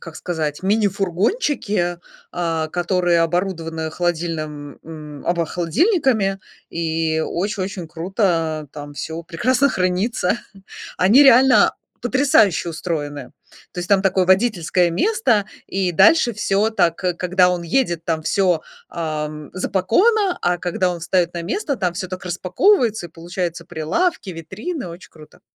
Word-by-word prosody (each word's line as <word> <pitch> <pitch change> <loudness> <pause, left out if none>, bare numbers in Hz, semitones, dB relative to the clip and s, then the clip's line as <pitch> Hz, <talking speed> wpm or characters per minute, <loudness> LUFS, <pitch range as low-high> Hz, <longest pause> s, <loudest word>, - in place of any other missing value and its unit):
как 165 -2 -10
сказать, 160 -2 -3
мини-фургончики, 200 - 0 0.3
а, 165 -2 -1
которые 175 0 +1
оборудованы 165 -2 -2
холодильным, 155 -4 -3
м, 150 -2 -10
обо 170 -2 +1
холодильниками, 205 - +1 0.3
и 160 -1 -1
очень 195 +2 -2
очень 190 -3 -6
круто, 175 +6 -3 0.4
а 150 - -10
там 145 -1 -9
всё 160 +3 -5
прекрасно 250 - +1
хранится. 185 +1 0 0.6
Они 215 +10 +6
реально 265 -1 +6 0.3
потрясающе 245 - +3
устроены. 145 -5 -4 0.4
То - - -9
есть 175 - -6
там 200 -1 +4
такое 190 -1 +2
водительское 185 -4 +2
место, 230 - +1 0.2
и 190 -2 -1
дальше 290 - +5
всё 210 +1 +1
так: 170 -7 +1
когда 180 0 +1
он 180 -1 -2
едет, 170 -2 0
там 160 -2 -1
всё, 180 -2 +1 0.3
ам, 150 -2 -4
запаковано, 355 - +2
а 175 0 +1
когда 180 +1 -1
он 175 - -4
встаёт 175 0 +1
на 170 - -4
место, 280 - -2
там 180 -4 -1
всё 185 0 -4
так 185 0 -7
распаковывается, 205 - +1
и - - -19
получаются 170 0 -5
прилавки, 185 - -1
витрины, 200 - -6
очень 170 +2 -11
круто! 155 -1 -17
180 Hz, 130 wpm, -20 LUFS, 165-205 Hz, 0.6 s, Они